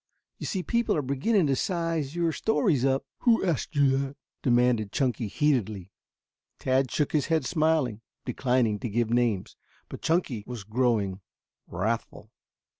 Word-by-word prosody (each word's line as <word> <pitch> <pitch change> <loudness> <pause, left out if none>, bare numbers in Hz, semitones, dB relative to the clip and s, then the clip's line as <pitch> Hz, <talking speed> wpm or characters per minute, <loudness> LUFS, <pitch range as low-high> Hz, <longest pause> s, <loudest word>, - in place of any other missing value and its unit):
You - - -4
see 185 -2 -2
people 235 -4 +1
are 150 - 0
beginning 155 - +1
to 135 -2 +2
size 165 -3 -1
your 170 -1 +1
stories 180 - +1
up." 135 0 +1
"Who 230 -4 +3
asked 165 -2 -1
you 140 -2 +4
that?" 140 0 -4 0.2
demanded 120 -4 +2
Chunky 125 -4 0
heatedly. 110 - 0 0.7
Tad 130 0 +1
shook 150 +2 0
his 150 -4 +1
head 160 -4 +1
smiling, 155 -9 +1 0.2
declining 125 -4 +1
to 120 - -4
give 115 +1 0
names. 120 -6 0 0.3
But - - -8
Chunky 160 - 0
was 120 -5 -6
growing 110 -3 0 0.5
wrathful. 110 +3 -3
130 Hz, 145 wpm, -27 LUFS, 115-160 Hz, 0.7 s, you